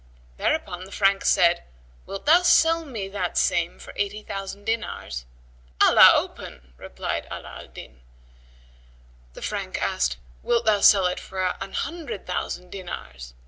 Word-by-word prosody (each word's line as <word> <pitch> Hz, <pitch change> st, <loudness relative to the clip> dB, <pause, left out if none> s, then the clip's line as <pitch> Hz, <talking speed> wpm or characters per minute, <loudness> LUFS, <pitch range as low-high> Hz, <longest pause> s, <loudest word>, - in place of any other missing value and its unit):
Thereupon 185 Hz, -, -1 dB
the 195 Hz, -, -14 dB
Frank 195 Hz, -1 st, +2 dB
said, 170 Hz, -1 st, +4 dB, 0.5 s
"Wilt 195 Hz, -, -7 dB
thou 330 Hz, +4 st, +6 dB
sell 330 Hz, -2 st, +4 dB
me 225 Hz, -9 st, -5 dB
that 185 Hz, -3 st, -3 dB
same 170 Hz, 0 st, +1 dB
for -, -, -12 dB
eighty 205 Hz, +1 st, -3 dB
thousand 195 Hz, 0 st, -6 dB
dinars?" 215 Hz, -, -3 dB, 0.5 s
"Allah -, -, +8 dB
open!" 65 Hz, +1 st, -5 dB
replied -, -, -5 dB
Ala 60 Hz, 0 st, -8 dB
al -, -, -11 dB
Din. 65 Hz, -1 st, -13 dB, 1.3 s
The -, -, -9 dB
Frank -, -, -3 dB
asked, 60 Hz, -1 st, 0 dB, 0.2 s
"Wilt 235 Hz, 0 st, +1 dB
thou 215 Hz, -2 st, +4 dB
sell 195 Hz, -2 st, +6 dB
it 180 Hz, -, 0 dB
for 185 Hz, -1 st, -2 dB
an 195 Hz, -, -6 dB
hundred 330 Hz, -, -4 dB
thousand 180 Hz, 0 st, -4 dB
dinars?" 65 Hz, -, -8 dB
195 Hz, 140 wpm, -24 LUFS, 170-215 Hz, 1.3 s, Allah